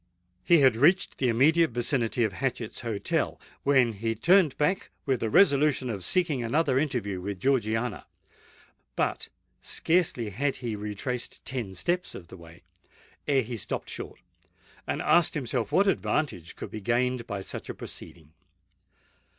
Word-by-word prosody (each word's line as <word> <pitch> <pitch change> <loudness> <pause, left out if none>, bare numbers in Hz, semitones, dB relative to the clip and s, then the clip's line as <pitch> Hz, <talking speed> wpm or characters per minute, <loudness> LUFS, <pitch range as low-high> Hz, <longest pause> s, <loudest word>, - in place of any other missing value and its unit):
He 170 -3 +5
had 130 -4 +5
reached 165 +11 +3
the 130 - +2
immediate 155 +8 +4
vicinity 120 0 0
of 110 -3 0
Hatchett's 125 -2 -3
Hotel, 110 -4 -1 0.2
when 130 -5 +3
he 115 +2 -2
turned 170 - +4
back 150 +6 0 0.2
with 135 -4 +1
the 110 - -1
resolution 140 - +4
of 100 -4 -5
seeking 155 - +1
another 135 +2 +2
interview 115 -10 -2
with 100 0 -5
Georgiana. 115 -3 0 0.9
But - - -1 0.3
scarcely 160 - 0
had 135 +7 -1
he 120 -4 -4
retraced 105 +4 -5
ten 120 -8 -4
steps 175 - -1
of 85 -2 -10
the 95 - -10
way, 85 0 -15 0.6
ere 135 -2 +3
he 120 +1 -5
stopped 100 - -4
short, - - -7 0.7
and - - -2
asked 170 -1 +4
himself 125 -6 -2
what 195 - +4
advantage 145 - -1
could - - -8
be 110 - -6
gained 120 +2 0
by 100 -3 -4
such - - -6
a - - -5
proceeding? 80 -3 -10
125 Hz, 150 wpm, -27 LUFS, 110-145 Hz, 0.9 s, He